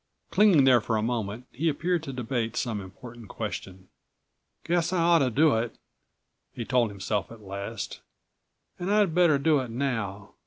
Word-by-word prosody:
Clinging 200 Hz, -9 st, +5 dB
there 130 Hz, -3 st, +5 dB
for 110 Hz, +1 st, -1 dB
a 105 Hz, -, -1 dB
moment, 115 Hz, 0 st, -3 dB
he 160 Hz, +6 st, 0 dB
appeared 170 Hz, +3 st, 0 dB
to 140 Hz, -, -6 dB
debate 120 Hz, -2 st, -3 dB
some 110 Hz, -5 st, -2 dB
important 115 Hz, +4 st, -11 dB
question. 95 Hz, -1 st, -6 dB, 0.8 s
"Guess 170 Hz, 0 st, 0 dB
I 185 Hz, -, 0 dB
ought 170 Hz, 0 st, +5 dB
to 135 Hz, -3 st, +2 dB
do 145 Hz, +3 st, +4 dB
it," 115 Hz, 0 st, -2 dB, 0.8 s
he 120 Hz, -, -6 dB
told 125 Hz, -2 st, +2 dB
himself 100 Hz, -2 st, -2 dB
at207 110 Hz, -3 st, -13 dB
last. 100 Hz, +1 st, -6 dB, 0.8 s
"And 180 Hz, +3 st, -2 dB
I'd 205 Hz, -5 st, +3 dB
better 170 Hz, -4 st, +4 dB
do 150 Hz, +1 st, +3 dB
it 130 Hz, -2 st, -4 dB
now. 115 Hz, -6 st, -3 dB
125 Hz, 165 wpm, -27 LUFS, 110-160 Hz, 0.8 s, Clinging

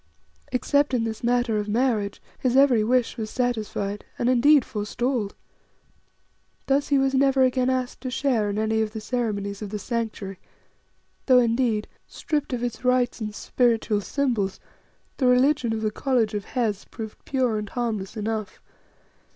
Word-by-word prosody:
Except 285 Hz, +2 st, +2 dB
in 235 Hz, -, +1 dB
this 225 Hz, 0 st, -4 dB
matter 240 Hz, -2 st, +2 dB
of 210 Hz, 0 st, -4 dB
marriage, 215 Hz, -3 st, 0 dB, 0.2 s
his 255 Hz, 0 st, +1 dB
every 260 Hz, -6 st, +5 dB
wish 245 Hz, +2 st, +1 dB
was 220 Hz, -2 st, -4 dB
satisfied, 215 Hz, -5 st, -2 dB
and 240 Hz, -, +1 dB
indeed 265 Hz, +2 st, +5 dB
forestalled. 220 Hz, +1 st, -2 dB, 1.3 s
Thus 280 Hz, +1 st, +1 dB
he 285 Hz, -, +3 dB
was 270 Hz, 0 st, +2 dB
never 270 Hz, 0 st, +4 dB
again 255 Hz, 0 st, +2 dB
asked 255 Hz, -1 st, -2 dB
to 255 Hz, -, -3 dB
share 250 Hz, -5 st, +1 dB
in 205 Hz, -, -3 dB
any 220 Hz, +1 st, +1 dB
of 215 Hz, -1 st, -2 dB
the 220 Hz, -, -4 dB
ceremonies 210 Hz, -3 st, -2 dB
of 210 Hz, -, -5 dB
the 210 Hz, -, -3 dB
Sanctuary, 215 Hz, -4 st, -4 dB, 0.9 s
though, 255 Hz, -2 st, +7 dB
indeed, 230 Hz, -2 st, +2 dB, 0.2 s
stripped 295 Hz, -3 st, -3 dB
of 245 Hz, -1 st, -2 dB
its 240 Hz, -1 st, -4 dB
rites 250 Hz, -1 st, +1 dB
and 210 Hz, -1 st, -4 dB
spiritual 230 Hz, -4 st, +1 dB
symbols, 230 Hz, -6 st, -1 dB, 0.6 s
the 260 Hz, -, +2 dB
religion 250 Hz, 0 st, +3 dB
of 220 Hz, -1 st, -2 dB
the 215 Hz, -, +1 dB
College 235 Hz, -2 st, 0 dB
of 205 Hz, -1 st, -3 dB
Hes 220 Hz, -6 st, -1 dB
proved 220 Hz, -2 st, -9 dB
pure 250 Hz, -5 st, 0 dB
and 210 Hz, -1 st, -6 dB
harmless 225 Hz, -4 st, -3 dB
enough. 215 Hz, -2 st, -3 dB
235 Hz, 160 wpm, -25 LUFS, 215-255 Hz, 1.3 s, though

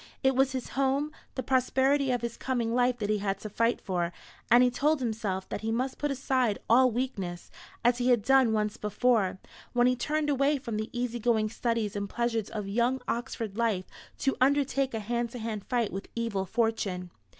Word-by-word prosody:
It 265 Hz, 0 st, +3 dB
was 270 Hz, 0 st, +3 dB
his 260 Hz, -2 st, -4 dB
home, 275 Hz, +2 st, 0 dB, 0.2 s
the 260 Hz, -, -2 dB
prosperity 265 Hz, +2 st, +2 dB
of 245 Hz, -2 st, 0 dB
his 235 Hz, -1 st, -3 dB
coming 240 Hz, -3 st, -1 dB
life 245 Hz, 0 st, +2 dB
that 210 Hz, -3 st, -3 dB
he 210 Hz, -, +1 dB
had 195 Hz, -1 st, -1 dB
to 215 Hz, -, -6 dB
fight 230 Hz, +3 st, +1 dB
for; 175 Hz, -2 st, -2 dB, 0.4 s
and 240 Hz, +2 st, +7 dB
he 250 Hz, -, +3 dB
told 295 Hz, +4 st, +2 dB
himself 215 Hz, -6 st, -2 dB
that -, -, -4 dB
he 220 Hz, 0 st, -2 dB
must 255 Hz, +3 st, -2 dB
put 295 Hz, -, 0 dB
aside 260 Hz, -5 st, +1 dB
all 255 Hz, +3 st, +6 dB
weakness, 205 Hz, -8 st, -4 dB, 0.3 s
as 240 Hz, 0 st, +4 dB
he 250 Hz, +1 st, +2 dB
had 240 Hz, -4 st, +4 dB
done 265 Hz, -1 st, +5 dB
once 215 Hz, 0 st, 0 dB
before, 210 Hz, -3 st, +1 dB, 0.4 s
when 245 Hz, 0 st, +4 dB
he 250 Hz, 0 st, +4 dB
turned 300 Hz, +5 st, -1 dB
away 280 Hz, +2 st, +2 dB
from 235 Hz, -5 st, -4 dB
the 215 Hz, +1 st, -3 dB
easy 240 Hz, -1 st, -2 dB
going 220 Hz, -2 st, +2 dB
studies 230 Hz, -3 st, -1 dB
and 200 Hz, 0 st, -3 dB
pleasures 230 Hz, -2 st, -1 dB
of 210 Hz, -3 st, -4 dB
young 240 Hz, +5 st, +1 dB
Oxford 230 Hz, -3 st, -3 dB
life 215 Hz, -6 st, +1 dB, 0.3 s
to 270 Hz, -, 0 dB
undertake 275 Hz, -1 st, +2 dB
a -, -, -1 dB
hand 235 Hz, +2 st, -2 dB
to -, -, -5 dB
hand 220 Hz, -3 st, -4 dB
fight 240 Hz, -4 st, 0 dB
with 195 Hz, +1 st, -6 dB
evil 220 Hz, -5 st, -2 dB
fortune. 200 Hz, -5 st, -1 dB
235 Hz, 200 wpm, -29 LUFS, 215-260 Hz, 0.4 s, and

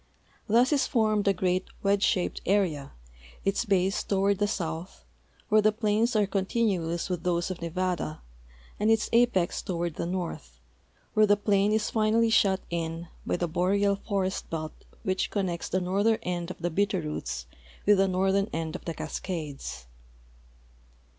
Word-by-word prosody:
Thus 240 Hz, +6 st, +4 dB
is 280 Hz, -, +2 dB
formed 215 Hz, -4 st, +1 dB
a -, -, +6 dB
great 185 Hz, 0 st, 0 dB, 0.2 s
wedge 200 Hz, 0 st, +2 dB
shaped 180 Hz, -3 st, +1 dB
area, 170 Hz, -8 st, +1 dB, 0.5 s
its 195 Hz, +4 st, +1 dB
base 195 Hz, -2 st, +2 dB
toward 195 Hz, 0 st, +1 dB
the 205 Hz, -, +2 dB
south, 170 Hz, -3 st, -4 dB, 0.4 s
where 215 Hz, 0 st, +5 dB
the 215 Hz, +1 st, +4 dB
plains 220 Hz, +2 st, +1 dB
are 210 Hz, -1 st, +4 dB
continuous 190 Hz, -4 st, 0 dB
with 180 Hz, -3 st, -2 dB
those 175 Hz, +1 st, 0 dB
of 180 Hz, -, -6 dB
Nevada, 170 Hz, -2 st, -2 dB, 0.6 s
and 210 Hz, -, +2 dB
its 225 Hz, -1 st, +2 dB
apex 230 Hz, -7 st, +3 dB
toward 170 Hz, -3 st, -3 dB
the -, -, -2 dB
north, 165 Hz, -, -5 dB, 0.5 s
where 215 Hz, 0 st, +5 dB
the 205 Hz, 0 st, +4 dB
plain 205 Hz, 0 st, +2 dB
is 215 Hz, 0 st, +1 dB
finall}' 225 Hz, +1 st, +3 dB
shut 190 Hz, -3 st, +4 dB
in 165 Hz, 0 st, -3 dB, 0.2 s
by -, -, +1 dB
the 175 Hz, -, -1 dB
boreal 200 Hz, +4 st, +2 dB
forest 195 Hz, -2 st, -2 dB
belt 155 Hz, -1 st, -4 dB, 0.3 s
which 185 Hz, 0 st, 0 dB
connects 185 Hz, -4 st, -2 dB
the 185 Hz, -, +1 dB
northern 200 Hz, +5 st, +2 dB
end 175 Hz, -1 st, -3 dB
of 185 Hz, -, -6 dB
the 175 Hz, +1 st, -2 dB
Bitterroots 155 Hz, -, -1 dB, 0.4 s
with 205 Hz, -1 st, +5 dB
the 195 Hz, -, +4 dB
northern 190 Hz, +2 st, +1 dB
end 160 Hz, -1 st, -3 dB
of -, -, -8 dB
the 165 Hz, -, -3 dB
Cascades. 150 Hz, -, -5 dB
190 Hz, 155 wpm, -28 LUFS, 170-205 Hz, 0.6 s, a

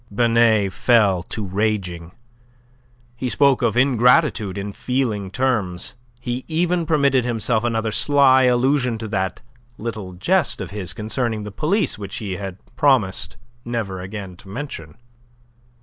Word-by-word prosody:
Binet 115 Hz, -3 st, +3 dB
fell 105 Hz, -7 st, +3 dB
to 105 Hz, +4 st, -5 dB
raging. 95 Hz, -4 st, -2 dB, 1.0 s
He 125 Hz, +1 st, -3 dB
spoke 140 Hz, 0 st, +3 dB
of 120 Hz, -1 st, +1 dB
ingratitude 125 Hz, -, +3 dB
in 100 Hz, +1 st, -4 dB
feeling 115 Hz, -4 st, -2 dB
terms; 100 Hz, -7 st, -1 dB, 0.3 s
he 125 Hz, +1 st, -4 dB
even 170 Hz, +1 st, 0 dB
permitted 140 Hz, -5 st, +3 dB
himself 115 Hz, -1 st, 0 dB
another 115 Hz, -2 st, -1 dB
sly 130 Hz, +1 st, +4 dB
allusion 125 Hz, 0 st, +2 dB
to 110 Hz, 0 st, -6 dB
that 95 Hz, -3 st, -2 dB, 0.4 s
little 105 Hz, -5 st, -5 dB
jest 175 Hz, -, +2 dB
of -, -, -6 dB
his 95 Hz, -3 st, -4 dB
concerning 110 Hz, 0 st, -2 dB
the 105 Hz, -, -7 dB
police, 165 Hz, -, 0 dB
which 100 Hz, -2 st, -6 dB
he 100 Hz, -4 st, -4 dB
had 95 Hz, -2 st, -6 dB, 0.2 s
promised 120 Hz, -9 st, +1 dB, 0.3 s
never 110 Hz, -6 st, -3 dB
again 95 Hz, -1 st, -7 dB
to 95 Hz, -, -15 dB
mention. 100 Hz, -, -7 dB
115 Hz, 135 wpm, -21 LUFS, 100-130 Hz, 1.0 s, sly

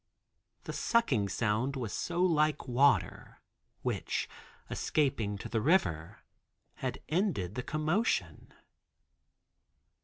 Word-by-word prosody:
The -, -, -6 dB
sucking 230 Hz, -, +1 dB
sound 115 Hz, +7 st, 0 dB
was 120 Hz, -6 st, -4 dB
so 175 Hz, +1 st, -1 dB
like 155 Hz, -4 st, +2 dB
water, 135 Hz, +3 st, +2 dB, 0.4 s
which, -, -, -1 dB, 0.4 s
escaping 115 Hz, -9 st, 0 dB
to -, -, -7 dB
the 115 Hz, -2 st, -1 dB
river, 90 Hz, -, +1 dB, 0.5 s
had -, -, -4 dB
ended 155 Hz, -, 0 dB
the 125 Hz, -, -3 dB
commotion. 155 Hz, -, -1 dB
135 Hz, 95 wpm, -31 LUFS, 105-165 Hz, 0.5 s, like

